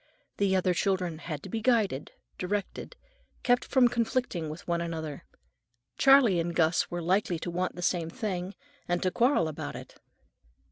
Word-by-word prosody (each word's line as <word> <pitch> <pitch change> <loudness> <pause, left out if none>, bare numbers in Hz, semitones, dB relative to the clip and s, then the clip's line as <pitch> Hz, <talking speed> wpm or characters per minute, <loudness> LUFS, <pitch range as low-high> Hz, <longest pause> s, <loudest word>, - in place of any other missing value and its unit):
The 195 -1 +2
other 185 -1 +2
children 180 -3 -1
had 155 -4 -6
to 195 - -8
be 225 +4 -3
guided, 215 - +1 0.3
directed, 200 +2 -3 0.5
kept 245 0 +3
from 260 -3 +4
conflicting 235 -8 -1
with 155 +3 -9
one 170 -1 0
another. 160 -4 -5 0.7
Charley 270 -9 +6
and 170 0 -2
Gus 165 +1 +2
were 175 -1 -4
likely 185 0 +1
to 175 +2 -5
want 180 +2 -2
the 180 - -6
same 170 -2 0
thing, 190 -3 -4 0.3
and 175 0 0
to 185 - +1
quarrel 240 - +3
about 155 - -5
it. - - -11
180 Hz, 160 wpm, -29 LUFS, 170-215 Hz, 0.7 s, Charley